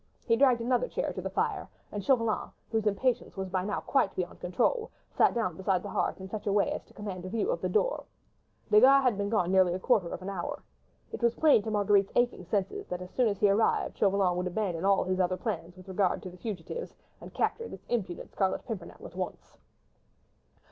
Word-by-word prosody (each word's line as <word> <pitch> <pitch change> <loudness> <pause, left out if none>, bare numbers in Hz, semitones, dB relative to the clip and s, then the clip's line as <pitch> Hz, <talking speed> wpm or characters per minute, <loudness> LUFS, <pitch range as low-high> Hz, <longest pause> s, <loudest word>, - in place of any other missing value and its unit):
He 230 - +4
dragged 250 -2 +4
another 250 - +1
chair - - -2
to - - -5
the - - -3
fire, - - -1 0.2
and 205 -1 -4
Chauvelin, 230 -4 +1 0.2
whose 220 -1 0
impatience 230 +2 0
was 190 -1 -3
by 185 0 -1
now 205 +1 -2
quite 270 -8 +1
beyond 180 -1 -4
control, 450 - 0 0.2
sat - - +3
down 215 -8 0
beside 190 0 0
the 205 - -6
hearth, - - -1
in 190 - -7
such 210 +2 -6
a - - +2
way 200 0 +2
as - - -4
to - - -22
command 195 -4 -6
a 185 - -5
view 230 - 0
of - - -2
the - - -1
door. - - +1 0.7
Desgas 265 +6 +7
had 250 -4 +3
been 200 0 -2
gone 185 -5 +1
nearly 185 -2 +4
a - - -3
quarter 200 -5 +2
of 185 - -6
an - - -6
hour. 185 -3 -4 0.5
It - - -6
was 235 0 +2
quite - - -19
plain 300 -8 +6
to 220 - -5
Marguerite's 205 -2 +3
aching 240 -7 +1
senses 195 +1 -2
that 180 0 -4
as 180 - -11
soon 250 -2 +2
as 200 -2 -1
he 205 - +5
arrived, 215 +3 +1
Chauvelin 195 -3 +3
would 180 0 -1
abandon 180 -2 -2
all 195 -1 +4
his 185 0 -1
other 185 0 +1
plans 185 -6 -4
with 185 +1 -14
regard 190 -1 0
to 185 - -7
the 180 - -13
fugitives, 215 - -6 0.3
and - - -10
capture 465 - -1
this - - -11
impudent 195 -7 -3
Scarlet 190 -2 -1
Pimpernel 195 -7 -7
at - - -10
once. 185 -1 -6
200 Hz, 225 wpm, -29 LUFS, 185-230 Hz, 0.7 s, Desgas